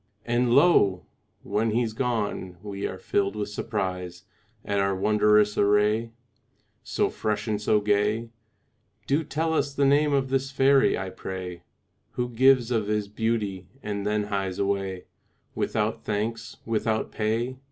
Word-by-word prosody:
And 120 0 +1
lo! 120 - +4 0.4
when 105 +3 0
he's 115 0 0
gone 110 -7 -2
we 100 -1 -4
are 95 - -6
filled 100 +2 -1
with 105 -1 -3
surprise 90 -5 -4 0.4
At 100 0 0
our 100 0 +1
wondrous 105 +1 +3
array, 105 +3 +3 0.7
So - - -1
fresh 110 +1 -2
and 105 -1 -1
so 105 0 +3
gay. 105 +2 +1 0.8
Do 145 +4 +1
tell 160 +3 -1
us 140 -3 0
the 140 - +2
name 145 +2 +4
of 135 -2 +1
this 135 0 0
fairy, 135 0 +4
I 95 0 -4
pray, 90 -2 -6 0.5
Who 125 0 -2
gives 125 0 +4
of 110 -4 0
his 105 -1 -1
beauty, 105 -4 -2 0.2
and 100 -1 -3
then 105 +1 0
hies 100 -2 -3
away 95 -2 -2 0.5
Without 110 0 -1
thanks, 110 +2 -3
without 110 0 -1
pay. 115 +4 -1
105 Hz, 140 wpm, -26 LUFS, 100-120 Hz, 0.8 s, lo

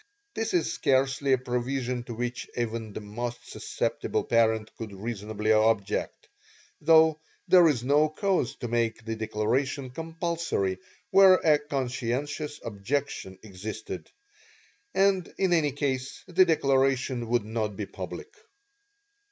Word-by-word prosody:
This 225 -3 -2
is 165 -3 +1
scarcely 135 +1 +1
a 130 - +5
provision 125 0 -2
to 120 - -6
which 120 +1 -4
even 115 -2 -2
the - - -6
most 120 +4 -6
susceptible - - -2
parent 110 -2 +1
could 110 -2 -7
reasonably 105 +1 -3
object, 110 -2 +1 0.5
though 160 -1 +5 0.3
there 180 -2 +7
is 130 -7 +1
no 145 +4 +3
cause 185 - 0
to 120 - -5
make 115 -1 -1
the 115 0 -3
declaration 120 +5 -1
compulsory 165 - -2 0.3
where 190 -1 +8
a 155 -4 +3
'conscientious' 140 +1 -3
objection 105 -2 -3
existed, 110 +2 -7 0.9
and 195 -2 +2
in 190 -2 +2
any 155 -4 +3
case 130 -2 -3
the 185 +1 +5
declaration 135 -5 +1
would 120 -2 +1
not 110 -2 -2
be 105 - -3
public. 430 - -8
125 Hz, 125 wpm, -27 LUFS, 110-150 Hz, 0.9 s, where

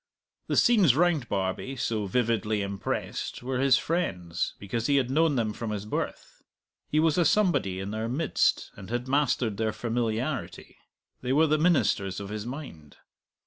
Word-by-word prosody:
The - - 0
scenes 205 - +5
round 160 -5 +2
Barbie, 95 +7 -2
so 110 -4 -2
vividly 110 -1 0
impressed, 100 +4 -4
were 130 0 -2
his 135 -1 +5
friends, 90 - -2
because 115 +4 -3
he 145 - +3
had 130 -2 +1
known 155 +1 +3
them 110 -4 0
from 115 0 -5
his 105 -1 -4
birth; 105 - -5 0.5
he 155 - +2
was 160 +1 +3
a - - +5
somebody 170 - +2
in 95 +1 -4
their 110 +1 -3
midst 150 +6 +1
and 95 - -10
had 120 +2 -2
mastered 130 -6 +1
their 110 -1 0
familiarity; 120 +4 -3 0.4
they 130 +1 -1
were 155 +3 +5
the 155 0 +2
ministers 140 - +2
of 100 -1 -7
his 105 +1 -5
mind. 120 - -9
120 Hz, 165 wpm, -27 LUFS, 105-145 Hz, 0.5 s, scenes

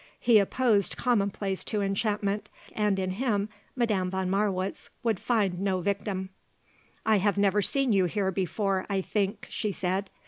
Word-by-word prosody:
He 235 -3 +6
opposed 205 -1 +2
commonplace 200 -5 0
to 210 -2 -1
enchantment, 205 0 -1 0.2
and 210 -2 +1
in 185 -1 -1
him 210 -1 0 0.3
Madame 210 -7 +1
von 190 0 -1
Marwitz 195 -1 -1
would 225 -5 +1
find 200 -7 +1
no 190 -1 0
victim. 195 0 -2 0.8
"I 220 -1 +4
have 205 +1 +1
never 200 0 +3
seen 270 +3 +2
you 190 -2 +4
here 190 +1 0
before, 190 +1 -1
I 195 -1 +1
think," 200 +2 -1
she 210 - -2
said. 190 +1 -2
200 Hz, 150 wpm, -28 LUFS, 190-210 Hz, 0.8 s, He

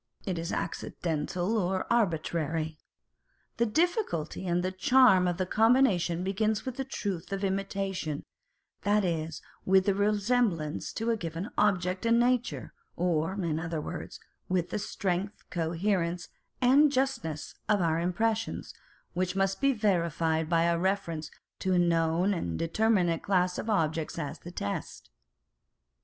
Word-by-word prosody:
It 185 -4 -2
is 165 +1 -3
accidental 175 +6 -2
or 185 0 0
arbitrary. 160 -6 0 0.8
The 235 0 +2
difficulty 220 - 0
and 175 0 +1
the 185 - -1
charm 190 -1 +5
of 175 -1 -1
the 185 - 0
combination 205 -6 +3
begins 215 +4 0
with 255 -1 -4
the 270 - -1
truth 200 -10 -4
of 195 0 -3
imitation, 195 -5 -2 0.6
that 205 0 +2
is, 160 -3 -2 0.2
with 190 0 +4
the 200 - +3
resemblance 205 -5 +1
to 225 +1 -1
a 225 - 0
given 170 +2 -5
object 185 -3 +1
in 230 0 +4
nature, 245 0 0 0.2
or 170 -1 0
in 170 -6 -1
other 165 -1 -3
words, - - -6 0.3
with 180 -2 0
the - - -1
strength, 195 0 -3
coherence, 170 0 -1 0.3
and 275 +4 +6
justness 250 - -1 0.2
of 210 -1 +4
our 165 -2 +1
impressions, 220 +6 -1 0.4
which 185 +1 -1
must 195 +2 0
be 275 0 +4
verified 170 - +1
by 165 -1 +3
a 170 0 +2
reference 170 -4 -1 0.3
to 185 - 0
a - - +3
known 170 +2 +2
and 85 - -3
determinate 175 -2 +1
class 180 -2 +1
of 225 - -4
objects 160 -6 0
as 155 -1 -4
the 175 - -9
test. 100 - -5
185 Hz, 140 wpm, -29 LUFS, 165-210 Hz, 0.8 s, and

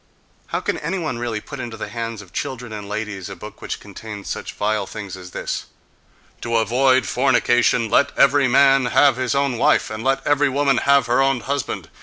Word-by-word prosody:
How - - -2
can - - -2
any 165 +6 -2
one 155 -9 -3
really 120 -3 -2
put 140 +6 -9
into 120 -3 -6
the 105 - -6
hands 115 -1 -5
of 90 - -20
children 125 -5 -5
and 105 -1 -7
ladies 105 -3 -4
a 100 - -7
book 105 +4 -11
which - - -5
contains 105 0 -9
such - - -5
vile 105 -1 -1
things 100 -3 -7
as 90 -1 -10
this: - - -4 0.8
"to 115 -1 -2
avoid 130 +4 +3
fornication, 120 -2 +2
let 140 - +3
every 140 0 +5
man 135 +1 +5
have 135 0 +4
his 130 +1 -1
own 140 -4 0
wife, - - +3
and 110 +1 -5
let 135 +1 0
every 145 0 +3
woman 135 -1 +2
have 140 -1 +5
her 125 +2 +2
own 135 -2 +2
husband 140 +1 -3
120 Hz, 200 wpm, -21 LUFS, 110-135 Hz, 0.8 s, every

